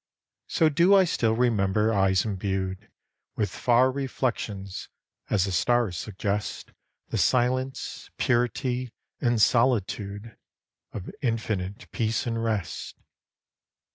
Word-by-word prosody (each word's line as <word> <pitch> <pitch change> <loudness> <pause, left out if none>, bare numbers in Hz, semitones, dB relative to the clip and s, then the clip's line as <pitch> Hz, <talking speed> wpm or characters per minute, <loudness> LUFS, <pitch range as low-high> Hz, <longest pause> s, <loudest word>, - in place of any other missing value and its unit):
So 165 - +3
do 170 +6 +5
I 195 - +7
still 115 -10 +1
remember 110 -2 +2
eyes 95 -1 +3
imbued 95 -2 -3 0.5
With 105 - -1
far 125 +2 +3
reflections 120 -7 -3 0.4
as 100 -3 +2
the 100 - -3
stars 120 0 +2
suggest 100 +3 -3 0.4
The - - -1
silence, 130 +2 0
purity 125 0 0 0.3
and 120 -3 +1
solitude 110 -3 +1 0.6
Of 95 - -6
infinite 110 -3 -2
peace 110 +1 -1
and 115 -1 -2
rest. 105 -6 -3
115 Hz, 105 wpm, -26 LUFS, 100-125 Hz, 0.6 s, I